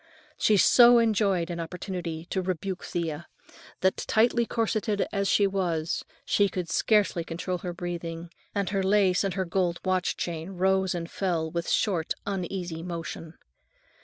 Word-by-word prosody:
She 210 - +3
so 240 +4 +7
enjoyed 200 -6 +2
an 170 - -4
opportunity 170 -1 -5
to 190 - 0
rebuke 185 +1 -3
Thea, 165 -2 -4 0.5
that, 190 0 +2
tightly 235 +1 +2
corseted 220 -2 0
as 200 -1 0
she 200 - +4
was, 175 -5 -1 0.2
she 200 -1 +3
could 180 -3 -4
scarcely 210 -5 +2
control 175 +2 -4
her 180 - -4
breathing, 170 -1 -5 0.2
and 200 -1 -1
her 195 -1 +1
lace 190 -1 +3
and 195 -2 -1
her 190 -1 -1
gold 175 -1 0
watch 185 -1 0
chain 170 +2 -4
rose 190 0 +1
and 170 -1 -4
fell 170 -4 -2
"with 170 0 -3
short, 180 -7 +1
uneasy 180 -3 -3
motion." 165 -1 -6
185 Hz, 150 wpm, -27 LUFS, 170-200 Hz, 0.5 s, so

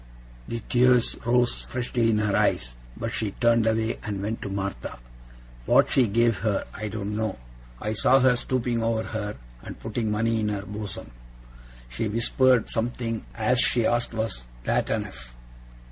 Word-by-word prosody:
The 115 0 -4
tears 125 -1 +4
rose 120 0 +2
freshly 120 -2 -1
in 110 - +2
her 105 -2 +1
eyes, - - +1 0.2
but 115 - -3
she 105 -3 -2
turned 115 -1 +4
away 110 0 0
and 105 -2 -4
went 105 +3 -3
to 100 - -4
Martha. 100 0 -4 0.7
What - - +5
she 125 -3 +4
gave 115 +1 +2
her, 105 -1 0
I 110 0 -5
don't 105 -1 -4
know. 110 -2 -2 0.4
I 105 - -2
saw 130 +5 +4
her 130 -1 +4
stooping 120 -1 -1
over 115 -1 0
her, 105 -2 -4 0.3
and - - -9
putting 110 0 -2
money 115 +2 +1
in 105 -1 0
her 100 -1 -3
bosom. 105 - -7 0.8
She 60 - -3
whispered 120 +2 +3
something, 115 -1 -3
as 120 +2 +2
she 120 -2 +4
asked 120 0 0
was 110 - -3 0.2
that - - 0
enough? - - -4
110 Hz, 160 wpm, -26 LUFS, 105-120 Hz, 0.8 s, What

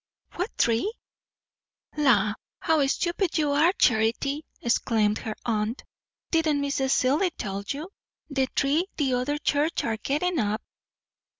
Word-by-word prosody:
"What 365 +5 -4
tree?" 235 - +2 1.0
"La! 225 -9 +3 0.3
how 320 -3 +2
stupid 345 +4 0
you 300 -2 +2
are, 305 +5 +4
Charity," 245 - +1 0.2
exclaimed 220 -2 +1
her 215 -1 -5
aunt. 220 +1 -1 0.5
"Didn't 320 -3 +2
Mrs. 275 -1 0
Seelye 285 +9 +3
tell 195 0 -4
you? 295 +4 -4 0.4
the 270 -3 0
tree 290 +8 +1
the 275 -4 +1
other 255 +4 0
church 295 +2 0
are 225 -1 -1
gettin' 305 +8 -1
up." 215 0 -1
275 Hz, 125 wpm, -26 LUFS, 230-310 Hz, 1.0 s, are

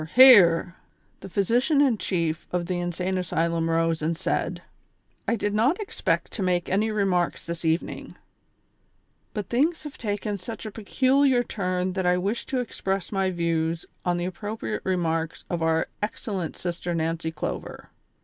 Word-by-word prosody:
hear!" 190 -10 +8 0.5
The 195 - -9
physician 240 - +2
in 260 -7 +3
chief 165 -3 -1
of 180 -1 -1
the 180 0 -2
insane 180 +2 -1
asylum 165 -1 0
rose 165 -1 +1
and 160 +1 -1
said: 190 - -1 0.4
" - - -43
I 235 - +2
did 205 -2 -1
not 250 - +2
expect 420 - -1
to - - -5
make 180 -2 +1
any 210 +4 +2
remarks 195 -5 0
this 170 0 -5
evening, 160 +1 -2 1.2
but 210 -2 -3
things 310 +7 +1
have 295 -2 -9
taken 205 -2 -2
such 225 +4 -7
a 215 - -5
peculiar 260 +4 +2
turn 185 -4 -2
that 190 -1 -1
I 180 0 +4
wish 200 +6 -2
to 260 - -1
express 195 -5 -3
my 195 -2 +1
views 165 -2 -1 0.2
on 175 -1 +1
tlie 175 - -2
appropriate 210 +4 -4
remarks 165 -3 -1
of 175 -1 -1
our 160 0 +2
excellent 200 -4 -3
Sister 175 0 -3
Nancy 165 0 -1
Clover. 150 - -6
185 Hz, 160 wpm, -25 LUFS, 170-215 Hz, 1.2 s, hear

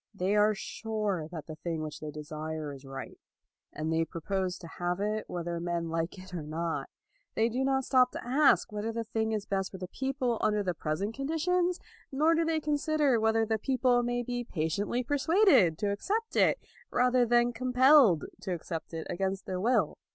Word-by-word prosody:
They 195 +2 0
are 210 +1 +4
sure 210 -6 -3
that 160 -4 -7
the 155 -1 -8
thing 165 -2 -3
which 155 -1 -6
they 155 - -6
desire 155 0 -5
is 135 0 -12
right, 135 0 -8 0.5
and 155 +1 -3
they 165 0 +2
propose 180 +3 -3
to 170 - -10
have 175 +1 -1
it 215 +1 -1
whether 170 -1 -3
men 170 -1 -2
like 165 +3 -2
it 185 0 -12
or 175 - -3
not. 160 +2 -3 0.5
They 225 +1 +2
do 250 +3 -1
not 265 0 +1
stop 255 -2 +4
to - - -6
ask 275 -1 +4
whether 210 +2 -3
the 230 0 -3
thing 220 0 -1
is 210 -2 -2
best 195 -1 -1
for 190 - -9
the 185 -1 -6
people 260 0 -2
under 210 -1 +2
the 180 -2 -1
present 170 +7 -2
conditions, 345 +6 0 0.3
nor 305 +4 +3
do 330 0 +2
they 325 -1 +1
consider 295 -3 +1
whether 220 0 +2
the 220 0 0
people 250 0 +2
may 245 0 -1
be 245 0 -3
patiently 200 +5 -1
persuaded 285 - +4
to 205 +1 0
accept 430 - -2
it, - - +4 0.3
rather 250 0 +3
than 240 0 +3
compelled 255 - +5 0.2
to 185 - -3
accept 165 0 -6
it 160 - -4
against 190 +1 -2
their 185 -1 -3
will. 220 -7 +1
210 Hz, 190 wpm, -30 LUFS, 170-255 Hz, 0.5 s, compelled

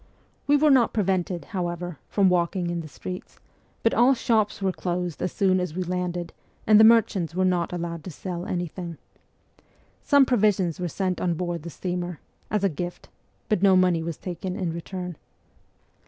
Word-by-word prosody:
We 290 +1 +5
were 300 +1 +4
not 250 -4 +4
pre 210 - +2
vented, 180 -2 -1
however, 175 -4 -3
from 200 -2 +3
walking 175 0 +1
in 170 - -2
the 160 - -8
streets, 180 +4 -8 0.5
but 230 - +3
all 250 +3 +5
shops 220 -3 +1
were 195 -1 +1
closed 175 -2 -3
as 180 - -1
soon 185 -1 +2
as 180 -3 -3
we 185 - -1
landed 180 -1 -3 0.3
and 215 -1 +6
the - - +8
merchants 215 -7 +4
were 185 0 +2
not 180 -2 +1
allowed 170 -2 -4
to - - -5
sell 175 +2 -6
anything. 175 -1 -4 1.0
Some 285 -2 +5
provisions 205 - +2
were 180 - -1
sent 185 +1 -2
on 175 -2 +1
board 175 -1 -3
the 170 - -7
steamer 175 0 -4 0.3
as 210 -2 0
a - - +5
gift, 175 +1 -6 0.4
but 210 -4 +1
no 195 -1 +6
money 180 -3 +3
was 165 -1 -4
taken 180 0 -5
in 180 -4 -2
return. 180 0 -6
180 Hz, 180 wpm, -25 LUFS, 175-195 Hz, 1.0 s, the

